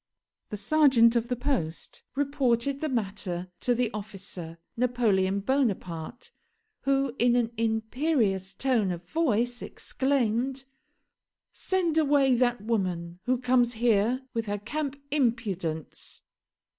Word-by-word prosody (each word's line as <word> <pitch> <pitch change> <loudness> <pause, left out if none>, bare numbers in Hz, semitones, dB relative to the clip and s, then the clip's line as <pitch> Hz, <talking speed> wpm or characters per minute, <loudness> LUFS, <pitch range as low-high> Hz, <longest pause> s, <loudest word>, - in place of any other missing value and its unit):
The 210 - -4
serjeant 240 0 +4
of 235 0 +1
the 250 - -1
post 245 - -3
reported 275 -1 +1
the 310 - -1
matter 195 -6 -3
to 245 - +1
the 240 -2 0
officer, 195 -5 -7 0.2
Napoleon 215 -6 +1
Bonaparte, 210 - -2 0.5
who 275 -2 +2
in 240 0 +4
an 235 -2 +1
imperious 220 - 0
tone 240 -6 +1
of 175 -1 -4
voice 245 - 0
exclaimed: 265 -1 -1 0.9
"Send 345 -4 +1
away 280 -3 +4
that 245 -2 +2
woman, 180 -6 -2
who 255 +1 +2
comes 245 -1 +2
here 235 +2 +2
with 230 -2 -2
her 205 0 -1
camp 285 +6 -4
impudence." 210 - -2
235 Hz, 115 wpm, -28 LUFS, 200-265 Hz, 0.9 s, serjeant